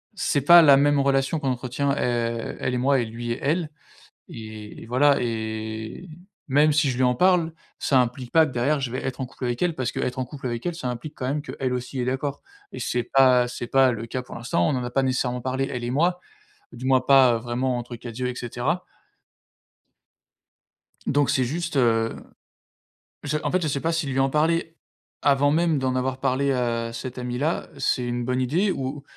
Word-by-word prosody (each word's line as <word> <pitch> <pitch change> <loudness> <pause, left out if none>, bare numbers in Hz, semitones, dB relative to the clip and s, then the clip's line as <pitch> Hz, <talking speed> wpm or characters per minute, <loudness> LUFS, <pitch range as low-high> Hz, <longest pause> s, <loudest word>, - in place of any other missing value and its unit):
c'est 145 - 0
pas 170 +5 +9
la 140 -4 +7
même 145 +1 +3
relation 135 +2 +1
qu'on 140 -3 -1
entretient, 130 +3 -1
heu, 120 -4 -1
elle 125 - -1
et - - 0
moi 135 +2 +2
et 120 - 0
lui 120 +1 -5
et 120 - -3
elle 155 +3 0 0.6
et 110 -1 -9
et - - -10
voilà 140 +4 +3
et 110 +5 -4 0.4
même 145 +2 +4
si 150 -1 +3
je 120 - -4
lui 130 - +2
en 125 0 +3
parle, 175 +1 +3 0.3
ça 135 - +3
implique 125 0 -4
pas 160 -1 +6
que 150 - -6
derrière 135 +5 +1
je 130 -3 -3
vais 130 - -4
être 135 0 -4
en - - -1
couple 125 0 -7
avec 120 -1 -2
elle 175 -3 +1
parce 130 -3 -2
qu'être 125 +1 -3
en 130 - -1
couple 135 +1 -7
avec 120 -1 -4
elle, 175 -1 -2
ça 145 -7 -5
implique 125 +5 -6
quand 130 - -4
même 145 +3 -1
qu'elle 135 -3 -3
aussi 125 +1 -4
est 125 - -1
d'accord 135 +2 -2 0.3
et - - -7
c'est 125 0 -1
pas, 125 0 +4
heu, - - -5
c'est 120 0 -6
pas 135 0 +4
le 115 -1 -4
cas 130 +2 -3
pour - - -11
l'instant. 115 -8 0
On - - +1
n'en 125 -2 -1
a 125 - -5
pas 135 +2 +1
nécessairement 125 -1 -1
parlé 130 +2 -1
elle 125 - -4
et 120 - -2
moi, 175 +6 +1 0.5
du 125 - -9
moins 130 -1 +4
pas, 130 -2 +5
heu, - - 0
vraiment 125 +2 -2
entre 120 0 -7
4 115 0 -9
yeux 125 0 -1
et 125 - -4
cetera. 125 +9 -2 2.2
Donc 145 0 +2
c'est 130 - +2
juste, 165 +3 -3
heu, 115 -3 +2 1.1
je 150 +1 -1
en - - 0
fait, 185 - +2
je 160 - 0
sais 140 -1 -1
pas 165 - 0
si 165 -1 -1
lui 135 -1 -1
en 135 0 +3
parler 160 +3 +1 0.5
avant 145 0 +4
même 160 -1 +2
d'en 130 -1 -1
avoir 130 0 -1
parlé, 135 +2 +1
heu, - - +2 0.4
à - - -10
cette 125 +2 -6
amie 125 0 -4
là, 155 +4 -1
c'est 125 -2 0
une 120 0 -2
bonne 125 +1 -1
idée 160 +11 +1
ou 135 -2 -4
130 Hz, 225 wpm, -24 LUFS, 120-145 Hz, 2.2 s, pas